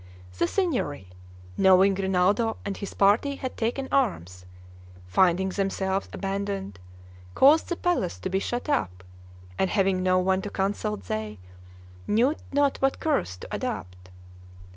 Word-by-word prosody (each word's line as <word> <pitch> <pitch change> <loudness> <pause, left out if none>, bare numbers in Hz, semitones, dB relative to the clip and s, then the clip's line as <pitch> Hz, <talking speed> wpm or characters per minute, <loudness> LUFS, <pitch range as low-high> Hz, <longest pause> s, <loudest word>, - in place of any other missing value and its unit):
The - - +3
Signory, 245 - -2 0.5
knowing 190 +1 +6
Rinaldo 195 +4 +1
and 200 - -3
his 200 - -7
party 215 +8 +3
had 260 -2 -6
taken 245 +4 -2
arms, 90 - -1 0.6
finding 185 - +2
themselves 195 0 -2
abandoned, 195 - -4 0.6
caused 295 +4 +5
the 345 - -1
palace 340 - -1
to - - -3
be 190 - +1
shut 245 +7 -3
up, 95 - -1 0.6
and 190 - +2
having 195 -2 +1
no 185 0 +3
one 190 +1 +1
to 205 - -5
consult 205 +2 -2
they 110 -1 -4 0.7
knew 245 +8 +2 0.2
not 285 -1 +2
what 270 0 +1
course 280 - -1
to - - -10
adopt. 90 0 -5
195 Hz, 135 wpm, -26 LUFS, 185-245 Hz, 0.7 s, knowing